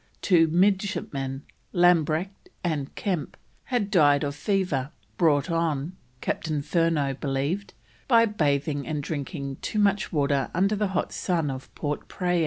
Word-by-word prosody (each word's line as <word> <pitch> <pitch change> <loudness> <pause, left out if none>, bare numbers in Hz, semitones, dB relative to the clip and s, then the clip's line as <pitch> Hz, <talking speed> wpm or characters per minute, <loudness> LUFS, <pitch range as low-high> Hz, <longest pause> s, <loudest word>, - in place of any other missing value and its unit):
Two 170 -4 +5
midshipman, 170 -7 0 0.3
Lambrecht 175 0 +2
and 155 -6 -2
Kemp, 180 -8 -2 0.3
had 230 -6 -1
died 145 -6 +5
of 145 -1 -1
fever, 150 -5 0 0.3
brought 155 0 +3
on, 165 0 -1 0.3
Captain 155 -3 -2
Furneaux 165 -4 +1
believed, 140 +8 -2 0.3
by 230 -3 +6
bathing 145 -7 0
and 150 -2 -2
drinking 140 -2 -4
too - - -4
much 205 -1 +2
water 140 -3 +1
under 195 +4 +2
the 210 0 0
hot - - -1
sun 165 -6 0
of 130 0 -8
Port 150 0 -3
Praya. 180 -2 0
160 Hz, 135 wpm, -26 LUFS, 145-185 Hz, 0.3 s, by